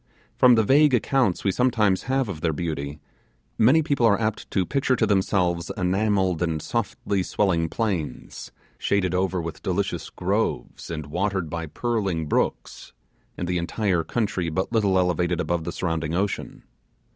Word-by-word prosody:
From 125 -1 +6
the 110 - +3
vague 140 +4 +5
accounts 120 -5 +1
we 100 - +2
sometimes 105 -4 +2
have 135 -1 +1
of 85 -6 -6
their 80 -1 +1
beauty, 75 -2 -4 0.6
many 130 +9 +5
people 140 -6 +2
are 100 -1 +3
apt 110 -1 -2
to 95 -2 0
picture 135 +2 +1
to - - +2
themselves 90 -4 +1
enamelled 95 -1 +1
and 80 -3 0
softly 100 0 -2
swelling 90 -4 0
plains, 95 -9 -4 0.3
shaded 95 -3 +1
over 95 0 0
with 85 -1 -6
delicious 95 +2 -2
groves, - - -2
and 75 -3 -4
watered 90 +1 -2
by 85 -1 -4
purling 100 -4 -1
brooks, 75 - -2 0.4
and 90 - -3
the 90 0 0
entire 90 0 0
country 100 -2 -1
but 95 +6 -2
little 105 -5 +2
elevated 90 -1 +1
above 85 -2 -1
the 85 - -3
surrounding 80 -3 -2
ocean. 100 +2 -3
95 Hz, 155 wpm, -24 LUFS, 85-110 Hz, 0.6 s, From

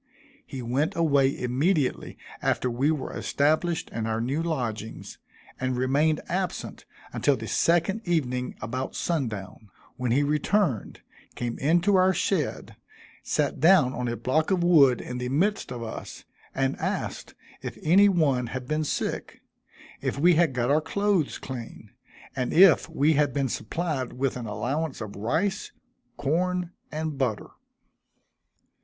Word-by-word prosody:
He 130 -2 -6
went 130 +6 0
away 140 -5 +2
immediately 140 +4 0 0.2
after 125 - 0
we 130 +5 +1
were 155 -4 -2
established 155 +4 0
in 115 -1 -3
our 110 0 -1
new 135 +7 -1
lodgings, 120 -9 -4 0.4
and 130 -1 -1
remained 145 +5 +2
absent 185 0 -3 0.3
until - - +2
the - - -7
second 175 +6 +2
evening 125 -8 -1
about 130 +5 -4
sundown, 110 - -3 0.3
when 125 -2 -1
he 140 +4 +3
returned, 150 - 0 0.3
came 120 -1 -4
into 175 +7 +3
our 185 0 +4
shed, 170 -8 -2 0.4
sat - - -1
down 160 -4 +5
on 125 0 -3
a 120 0 -2
block 155 +5 0
of 185 -3 +1
wood 140 -8 +5
in 125 0 -6
the 125 0 -3
midst 185 +5 0
of 120 -2 -5
us, 110 - -8 0.3
and 135 0 0
asked - - -3 0.3
if - - -6
any 195 +6 +6
one 140 -9 +2
had 130 +1 -6
been 155 +2 0
sick; 150 - -3 0.6
if - - -2
we 175 +5 +5
had 165 -4 +3
got 125 +1 0
our 150 +2 +4
clothes 195 0 0
clean; 120 -4 -8 0.4
and 125 -1 -2
if 185 -2 +6
we 150 +3 +2
had 150 0 +1
been 135 -2 0
supplied 135 +3 -3
with 135 +1 -1
an 120 -3 -5
allowance 135 +8 -2
of 110 -3 -7
rice, 155 - -1 0.5
corn 175 +5 0 0.2
and 155 -2 -4
butter. 120 -6 -1
140 Hz, 145 wpm, -26 LUFS, 125-165 Hz, 0.6 s, any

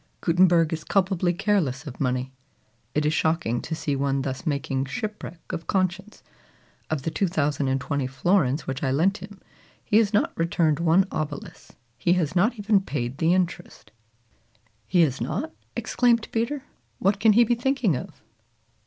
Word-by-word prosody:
Gutenberg 170 -2 +3
is 160 -1 -4
culpably 185 -2 +1
careless 175 -7 0
of 135 -4 -9
money. 130 0 -1 0.6
It 150 0 +1
is 150 - +2
shocking 160 -8 0
to 160 - -4
see 145 -2 -2
one 135 0 0
thus 135 +5 -5
making 140 -2 -1
shipwreck 180 +5 -5
of 165 - -5
conscience. 190 +2 -2 0.7
Of 155 -4 -2
the 165 - -2
2,020 140 -6 0
florins 140 +1 +1
which 135 0 -4
I 135 - 0
lent 170 +10 +2
him, 200 -2 -11 0.5
he 210 - +3
has 220 -3 +3
not 210 - +1
returned 165 -2 +1
one 170 +3 +4
obolus. 150 -2 -6 0.3
He 170 +7 +3
has 170 -3 0
not 220 +7 +2
even 205 -1 +2
paid 135 -7 -4
the 170 +2 +3
interest." 175 -1 -3 1.0
"He 180 -1 +3
has 140 -5 +1
not!" 225 - -3 0.2
exclaimed 235 -2 +1
Peter. 245 +5 -1 0.3
"What 195 - +1
can 215 0 +5
he 235 +3 +6
be 235 - +2
thinking 245 - +1
of?" - - -8
165 Hz, 155 wpm, -25 LUFS, 140-195 Hz, 1.0 s, he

